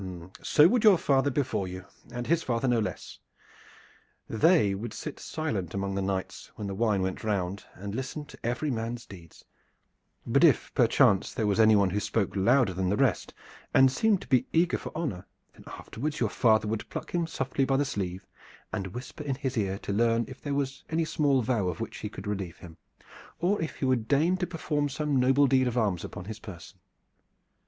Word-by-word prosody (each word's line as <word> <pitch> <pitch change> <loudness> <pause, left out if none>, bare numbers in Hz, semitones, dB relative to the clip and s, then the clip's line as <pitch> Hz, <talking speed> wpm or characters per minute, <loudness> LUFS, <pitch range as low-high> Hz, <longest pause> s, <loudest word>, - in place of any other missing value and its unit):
"So 150 +1 +5
would 235 +4 +2
your 210 -4 +7
father 140 -2 +2
before 130 -8 -1
you, 90 0 -7 0.3
and 120 0 -4
his 165 +3 +2
father 120 -1 -1
no 120 -2 +3
less. 95 -6 -5 1.1
They 115 - +3
would 105 +3 -5
sit - - -6
silent 105 - -3
among 100 0 -2
the 100 - -1
knights 95 -1 -4
when 105 - -6
the 100 - -3
wine 105 -2 +1
went 95 0 -3
round 100 -2 -2
and 100 +2 -6
listen 135 +5 -4
to - - -14
every 125 +5 -1
man's 115 0 -4
deeds; 85 -7 -14 0.8
but - - +2
if - - +4
perchance 95 -1 +3
there 110 - 0
was 105 +1 +1
anyone 105 -4 +5
who 105 - 0
spoke 105 0 -1
louder 115 +1 +3
than 90 0 -1
the 100 - +1
rest 130 - 0 0.4
and 135 -1 +6
seemed 205 +7 +2
to - - -11
be 130 -2 +2
eager 170 +2 +2
for - - -7
honor, 145 - -4 0.3
then - - -17
afterwards 150 +6 -5
your 115 - +1
father 110 -2 +3
would 110 0 -3
pluck - - -6
him 170 -2 0
softly 135 -3 -1
by 135 0 +2
the 145 - +1
sleeve 95 -7 -4 0.5
and 100 -3 -2
whisper 125 +4 -7
in 140 -2 -2
his 130 0 -3
ear 100 -4 -1
to 100 - -4
learn 115 +2 +2
if - - -11
there 145 -1 -2
was 135 -1 -2
any 160 0 0
small 140 -5 +2
vow 110 -5 0
of 90 - -3
which 115 - -5
he 105 - -5
could 100 - -9
relieve 95 -4 -4
him, 85 -2 -12 0.6
or 185 +3 +1
if 160 - -4
he - - -3
would 125 -4 +1
deign 160 +6 +3
to 185 -1 -2
perform 150 -4 -1
some 145 -1 0
noble 135 +3 +4
deed 130 -1 +3
of 125 0 -2
arms 100 -7 0
upon 100 -3 -7
his 110 +1 -7
person. 95 -2 -11
115 Hz, 200 wpm, -28 LUFS, 100-140 Hz, 1.1 s, your